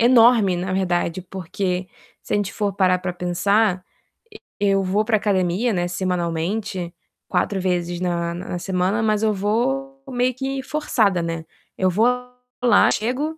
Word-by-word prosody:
enorme, 230 -5 +5
na 185 +1 -3
verdade, 175 -2 0
porque 185 0 -3 0.4
se - - -6
a - - +4
gente 205 -1 -1
for 205 -2 -1
parar 185 -2 +3
pra 180 -1 -3
pensar, 185 +2 +1 0.8
e 205 - +2
eu 195 0 +3
vou 195 +3 +1
pra 220 -1 +3
academia, 200 +2 +1
né, 175 -2 0
semanalmente, 175 +1 -2 0.3
4 200 - 0
vezes 175 -1 -1
na 170 -1 -1
na 180 0 -5
semana, 190 +4 0
mas 215 -1 +1
eu 215 -1 +3
vou 270 +7 -1
meio 250 0 +1
que 270 +1 -3
forçada, 225 - +1
né. 165 -1 -3 0.3
Eu 185 - +2
vou 215 +7 +3 0.6
lá, 245 - +5
chego 270 +8 -1
195 Hz, 155 wpm, -22 LUFS, 180-225 Hz, 0.8 s, enorme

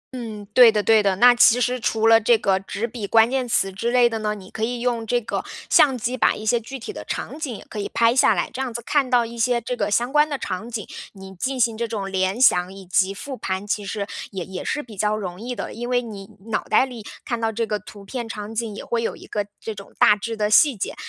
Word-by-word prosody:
嗯， 220 -4 -7
对 245 -1 +8
的 210 -1 0
对 220 0 +5
的， 195 -2 +1
那 245 +5 +7
其 245 0 +5
实 250 +1 0
除 225 -1 0
了 225 0 +6
这 230 +2 +4
个 195 -3 +1
纸 200 +3 -4
笔 220 -3 -6
关 225 +3 +4
键 260 -2 -1
词 195 -4 +1
之 215 +5 -2
类 245 0 +4
的 225 -1 -3
呢， 210 -1 -2
你 190 -2 -13
可 220 - -5
以 240 +2 -1
用 235 -2 -1
这 245 +2 +2
个 225 - -4 0.3
相 270 -4 +5
机 245 +2 -2
把 - - +2
一 215 - -8
些 235 +2 +2
具 250 +4 -8
体 255 - -7
的 - - -7
场 - - -5
景 275 -7 -4
也 - - -13
可 215 - -7
以 200 - -3
拍 230 +1 +3
下 260 - +4
来， - - -1
这 260 - -4
样 260 -2 -3
子 235 +1 -6
看 280 -3 +1
到 245 -2 +3
一 235 +1 -9
些 240 +1 +2
这 245 +2 -4
个 - - -1
相 240 +5 0
关 300 +1 +4
的 285 - -2
场 200 0 -5
景， 220 -4 -5 0.3
你 190 -1 -11
进 260 +8 -3
行 230 -2 +2
这 235 +1 -2
种 200 -3 -4
联 190 +3 0
想 180 -8 +4
以 195 0 -11
及 185 +2 +2
复 265 +7 -7
盘， 190 -4 -4
其 205 0 -2
实 200 0 -3 0.2
也 190 -4 -5
也 190 -1 -7
是 295 - -2
比 225 -3 -13
较 210 +2 0
容 185 -2 -6
易 245 +2 -5
的， 200 - -5
因 240 +2 -5
为 245 0 +1
你 200 -4 -9 0.2
脑 215 - 0
袋 - - +3
里 245 -4 -9 0.2
看 235 -1 -3
到 225 0 0
这 230 +1 -2
个 210 -1 -2
图 205 0 -13
片 235 +2 -5
场 210 0 -6
景 225 -2 -3
也 - - -8
会 235 -1 -1
有 230 - -2
一 - - -13
个 205 -1 -3
这 220 - -5
种 200 -1 -12
大 210 - +6
致 225 +2 -5
的 210 -1 +1
细 250 +4 +5
节。 - - -3
225 Hz, 295 characters per minute, -22 LUFS, 205-245 Hz, 0.3 s, 对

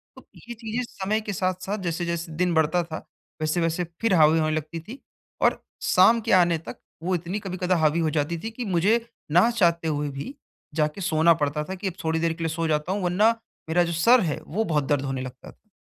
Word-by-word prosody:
तो - - -15
ये 240 - -9
चीज़ें 225 +1 -3
समय 200 +3 -1
के 210 -1 -4
साथ-साथ 185 +2 -2
जैसे-जैसे 170 -1 -3
दिन 180 +1 +1
बढ़ता 160 +2 +2
था, 160 -1 -6 0.4
वैसे-वैसे 165 +2 0 0.2
फिर 225 -3 +2
हावी 160 0 +5
होने 155 0 +1
लगती 155 +2 -4
थी 215 +11 -10 0.4
और - - +2 0.2
शाम 225 +6 +5
के 225 - -2
आने 175 -2 +5
तक - - -7 0.3
वो 185 +2 +1
इतनी 175 +4 -3
कभी-कदा 185 -2 -1
हावी 160 +1 +2
हो 160 - +1
जाती 150 +2 -1
थी 225 - -4
कि 240 +2 -5
मुझे, 205 +5 +2 0.3
ना 180 +9 +5
चाहते 170 -7 +2
हुए 150 -1 -1
भी 140 - -6 0.4
जा 150 -1 +3
के 195 - -7
सोना 165 -2 +4
पड़ता 145 +1 -1
था 190 +5 -6
कि 190 +1 -4
अब 185 - -3
थोड़ी 160 0 0
देर 165 0 +1
के 165 0 -6
लिए 165 -1 -1
सो 165 0 -1
जाता 150 +2 0
हूँ 200 0 -1
वरना 180 +5 +4 0.4
मेरा 175 +2 +3
जो 170 - -2
सर 230 +10 +5
है - - -4
वो 210 +8 -1
बहुत 150 -5 +1
दर्द 140 -1 +1
होने 135 -1 -3
लगता 130 0 -9
था। 215 - -31
170 Hz, 225 wpm, -25 LUFS, 160-190 Hz, 0.4 s, हावी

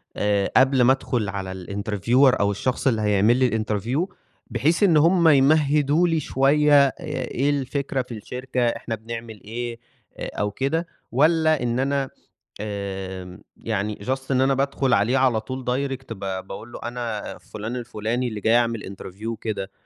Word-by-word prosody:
آآ 100 -1 +1
قبل 130 0 +5
ما 125 +2 +6
أدخل 120 -5 -2
على 95 -1 -4
الinterviewer 110 +7 +2
أو 100 0 +2
الشخص 125 +7 -1
اللي 115 -4 +2
هيعمل 105 +3 +3
لي 130 -1 +3
الinterview 110 - -1 0.3
بحيث 165 +7 +1
إن 175 -6 +5
هُم 170 +2 +4
يمهدوا 150 +2 +4
لي 165 -1 +1
شوية، 145 +1 +4
آآ 135 - -4 0.3
إيه 130 +3 -1
الفكرة 140 -1 -1
في 125 -1 -8
الشركة، 125 +3 -4
إحنا 115 -1 -2
بنعمل 115 -1 -8
إيه، 120 +2 -5 0.4
آآ - - -5
أو 105 0 0
كده؟ 150 - -1 0.2
والّا 155 +2 +3
إن 120 0 0
أنا 135 0 0 0.5
آآ 95 -3 -5 0.2
يعني 105 -1 -3
just 130 +1 -2
إن 130 -1 +3
أنا 135 +1 +3
بادخل 135 -1 0
عليه 115 +5 +3
على 125 -4 +3
طول 130 +4 -6
direct 130 -1 -2
ب 100 - -13
باقول 95 +3 -6
له - - -8
أنا 120 -3 -4
فلان 110 +3 -7
الفلاني 120 +1 -2
اللي 110 -3 -5
جاي 115 +3 +4
أعمل 115 -5 -1
interview 95 +3 -10
وكده. 110 -3 -4
120 Hz, 160 wpm, -23 LUFS, 105-135 Hz, 0.5 s, ما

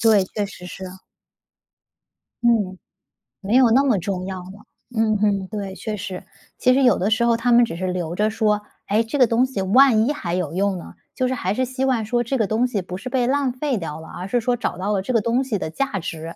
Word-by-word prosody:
对， 220 -4 +5
确 210 - 0
实 180 -2 -11
是。 190 +1 -8 1.6
嗯， 205 -6 +2 0.6
没 200 +4 0
有 255 -2 +6
那 265 +4 +5
么 255 -7 +2
重 185 0 -3
要 190 -1 -5
了， 190 +4 -12 0.3
嗯 220 -1 +2
哼， 200 -2 +1
对， 200 -1 -5
确 215 +1 -4
实。 190 -2 -6 0.3
其 255 - +4
实 275 - +3
有 245 -6 +5
的 195 +4 0
时 225 +2 +2
候 235 -1 +3
他 240 +1 0
们 240 +1 +7
只 225 - -6
是 185 +2 -3
留 175 -2 -3
着 210 +3 +2
说， 215 -1 +1 0.3
诶， 215 +3 +2
这 225 +6 -3
个 255 - +6
东 235 +3 +3
西 260 -7 -4
万 225 +3 +5
一 - - +2
还 175 -12 -3
有 170 -4 -2
用 195 +1 0
呢， 170 - -10 0.2
就 255 - 0
是 255 - -1
还 195 -6 -1
是 255 +3 0
希 260 +1 -2
望 245 -5 +1
说 240 +2 0
这 265 +3 -1
个 220 - +2
东 230 +4 +1
西 210 -6 -2
不 180 0 -7
是 200 +7 -7
被 250 -1 +1
浪 275 -1 +1
费 260 0 -1
掉 160 -4 -5
了， 160 - -11
而 180 - -6
是 245 +4 +1
说 245 +1 +1
找 235 -6 -3
到 195 +3 -2
了 195 - +1
这 250 +6 -3
个 230 - +3
东 235 +5 +1
西 245 -6 -2
的 160 - -4
价 220 +3 -2
值。 165 -1 -6
215 Hz, 265 characters per minute, -22 LUFS, 190-245 Hz, 1.6 s, 们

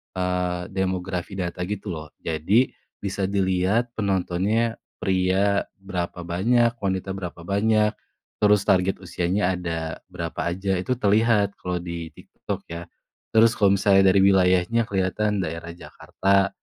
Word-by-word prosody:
eee, 90 -1 -1
demografi 95 0 -2
data 90 -1 -4
gitu 105 0 -4
loh, 80 -2 -6 0.2
jadi 90 +10 +2 0.3
bisa 95 -1 -1
dilihat 100 +4 +1
penontonnya 100 +3 0 0.2
pria 95 +2 +2
berapa 90 -2 -4
banyak, 115 +7 +2
wanita 95 -1 -2
berapa 90 -3 -6
banyak, 105 +3 +2 0.5
terus 105 -1 +4
target 95 0 +2
usianya 90 +2 0
ada 80 -2 -4
berapa 85 -2 -6 0.2
aja 95 +1 -2
itu 125 +8 -1
terlihat 105 -2 +3
kalau 90 -1 -2
di 85 -2 -5
TikTok - - -7
ya, 85 +1 -7 0.5
terus 115 +1 +6
kalau 100 -3 +3
misalnya 95 -1 +5
dari - - +3
wilayahnya 95 +3 +3
kelihatan 100 +2 0
daerah 85 +2 -5
Jakarta, 100 +2 0
95 Hz, 125 wpm, -24 LUFS, 90-100 Hz, 0.5 s, terus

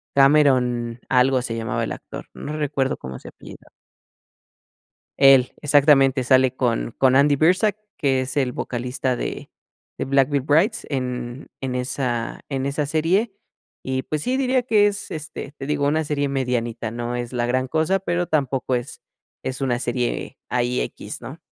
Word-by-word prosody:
Cameron, 130 -4 +3
algo 130 0 +3
se 120 -2 -4
llamaba 115 -1 -2
el - - -3
actor, - - -9
no 150 - -6
recuerdo 140 -3 -1
cómo 65 0 -7
se - - -11
apellida. - - -14 1.5
Él, 135 -2 +6
exactamente, 140 -3 +4
sale 130 0 +4
con 120 -2 -1
con 130 -1 +4
Andy 145 +1 +5
Birzak 185 +7 +3 0.2
que 135 -2 +1
es 130 +2 -6
el 130 -3 +1
vocalista 125 +1 -2
de - - -5 0.5
de - - -1
Black 135 0 +3
Veil 140 -2 +1
Brides 165 - +2
en 125 -1 -4
en 130 -2 -3
esa 125 -2 -2
en 135 -1 -2
esa 140 +1 -1
serie. 180 +8 +1 0.5
Y, 130 0 -2
pues, 155 +1 -3
sí 255 +1 0
diría 260 -1 +2
que 215 -4 +4
es 205 0 -2
este 155 -2 -7
te 140 -2 -8
digo 145 -1 0
una 155 +2 +1
serie 145 -1 -1
medianita, 120 -4 -2
no 120 +1 -4
es 120 0 -5
la 120 -1 0
gran 130 +1 0
cosa, 160 +6 +1
pero, 175 -1 -1
tampoco 135 -4 0
es 120 +2 -4 0.4
es 130 +1 -4
una 125 -2 +1
serie 125 +1 -2
ahí 125 0 0
equis, - - -6
¿no? - - -8
135 Hz, 165 wpm, -22 LUFS, 125-150 Hz, 1.5 s, Él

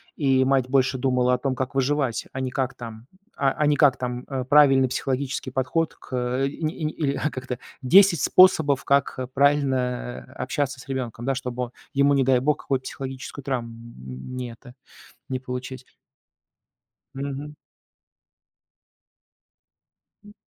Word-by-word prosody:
и 135 -3 +3
мать 130 -1 +2
больше 130 0 +2
думала 125 -1 +2
о 125 - +3
том, 130 +1 -2
как 130 +2 -4
выживать, 135 -2 0
а 130 - -3
не 130 -1 -2
как 130 0 -1
там, 115 0 -10 0.3
а, 135 -1 +2
а 150 - 0
не 145 -1 +3
как 145 -4 +5
там, 125 0 -4
э, 135 -2 -3
правильный 135 -1 +5
психологический 130 +1 -2
подход 135 +6 -1
к, - - -14
э, 125 +2 0
и 145 - -11
ни 155 +1 0
и 160 - -7
ни 155 - 0
или 140 -3 -1
как-то: 130 -1 -5 0.2
10 180 +6 +6
способов, 160 -7 +5
как 140 0 +1
а 130 -1 -3
правильно 130 -3 0
общаться 140 +1 -2
с 130 - -13
ребёнком, 120 -3 -4
да, 135 - +1
чтобы 125 -1 -4 0.2
ему, 140 +1 +4
не 140 -1 +3
дай 130 -1 +3
бог, 145 +3 +1
какую-то 135 -2 -1
психологическую 135 +1 -7
травм, 130 -4 -1
м, 115 - -10
не 125 -1 -4
это, 125 +2 -14 0.6
не 130 -1 -2
получить. 125 0 -6 1.3
Мгм. 140 +2 -5 2.7
М. 205 0 -15
130 Hz, 155 wpm, -24 LUFS, 125-140 Hz, 2.7 s, 10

